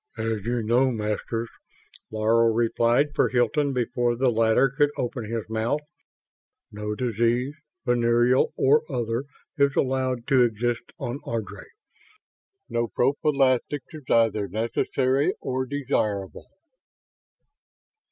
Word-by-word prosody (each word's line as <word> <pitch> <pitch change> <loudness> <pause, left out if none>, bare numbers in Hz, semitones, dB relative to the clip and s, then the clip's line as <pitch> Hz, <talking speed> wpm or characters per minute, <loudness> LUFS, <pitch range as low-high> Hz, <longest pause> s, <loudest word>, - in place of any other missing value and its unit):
"As 110 -2 -2
you 120 -1 -1
know, 120 +4 +3
Masters," 115 0 -3 0.6
Laro 110 +2 +2
replied 120 +5 +2
for - - +2
Hilton 135 +4 +1
before 120 -1 0
the 125 +1 +2
latter 115 +3 +3
could 145 +2 +1
open 120 -1 -3
his 115 0 -4
mouth, 110 +6 -1 0.9
"no 105 0 -4
disease, 120 +3 0 0.3
venereal 120 +1 +3
or 145 +3 +4
other, 120 0 -2 0.3
is 140 -1 +3
allowed 130 -2 0
to 135 -3 +5
exist 120 0 0
on 120 +4 -4
Ardry. 110 -3 -5 1.0
No 120 0 -1
prophylaxis 135 +2 +1
is 155 - -8
either 110 -3 +2
necessary 130 +6 0
or 130 0 -2
desirable." 110 -8 -2
120 Hz, 110 wpm, -25 LUFS, 115-130 Hz, 1.0 s, to